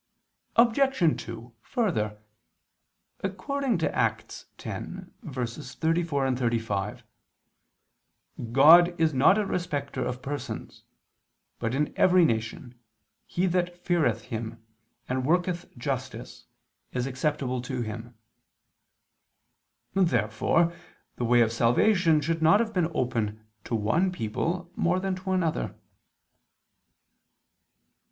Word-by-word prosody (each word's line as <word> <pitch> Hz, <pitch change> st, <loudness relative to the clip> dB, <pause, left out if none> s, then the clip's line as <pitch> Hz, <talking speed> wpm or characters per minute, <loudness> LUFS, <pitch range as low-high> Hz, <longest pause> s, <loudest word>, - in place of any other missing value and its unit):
Obj. 235 Hz, -, +3 dB
2: 115 Hz, +1 st, -9 dB
Further, 110 Hz, -, -1 dB, 1.0 s
according 235 Hz, +6 st, -1 dB
to 165 Hz, -, -1 dB
Acts -, -, -1 dB
10:34, 135 Hz, +3 st, -3 dB
35, 115 Hz, -4 st, -1 dB, 1.5 s
"God 170 Hz, +7 st, +7 dB
is 160 Hz, -1 st, +3 dB
not 140 Hz, +10 st, +5 dB
a 210 Hz, -, +1 dB
respecter 170 Hz, -7 st, -2 dB
of 125 Hz, 0 st, -4 dB
persons: 135 Hz, -5 st, -6 dB, 0.8 s
but 115 Hz, +2 st, -1 dB
in 150 Hz, +2 st, 0 dB
every 180 Hz, -1 st, +5 dB
nation, 115 Hz, 0 st, -2 dB, 0.5 s
he 180 Hz, -, 0 dB
that 175 Hz, -1 st, 0 dB
feareth 160 Hz, -, +1 dB
Him, 115 Hz, -2 st, -6 dB, 0.4 s
and 130 Hz, 0 st, -1 dB
worketh 175 Hz, +4 st, 0 dB
justice, 130 Hz, 0 st, -5 dB, 0.4 s
is 125 Hz, -1 st, -1 dB
acceptable 130 Hz, -1 st, -1 dB
to 125 Hz, -1 st, -3 dB
Him." 115 Hz, +2 st, -7 dB, 1.8 s
Therefore 170 Hz, -, +2 dB, 0.4 s
the 120 Hz, -, -1 dB
way 120 Hz, +1 st, +5 dB
of 110 Hz, -1 st, +3 dB
salvation 155 Hz, -, +3 dB
should 165 Hz, +2 st, -1 dB
not 160 Hz, +6 st, +6 dB
have 225 Hz, -1 st, -1 dB
been 175 Hz, -3 st, +1 dB
opened 110 Hz, -5 st, -1 dB, 0.3 s
to 115 Hz, -, -2 dB
one 155 Hz, -, +1 dB
people 170 Hz, +6 st, -3 dB
more 175 Hz, +2 st, +1 dB
than 190 Hz, 0 st, -1 dB
to 185 Hz, +1 st, -7 dB
another. 180 Hz, -4 st, 0 dB
145 Hz, 100 wpm, -27 LUFS, 120-175 Hz, 1.8 s, God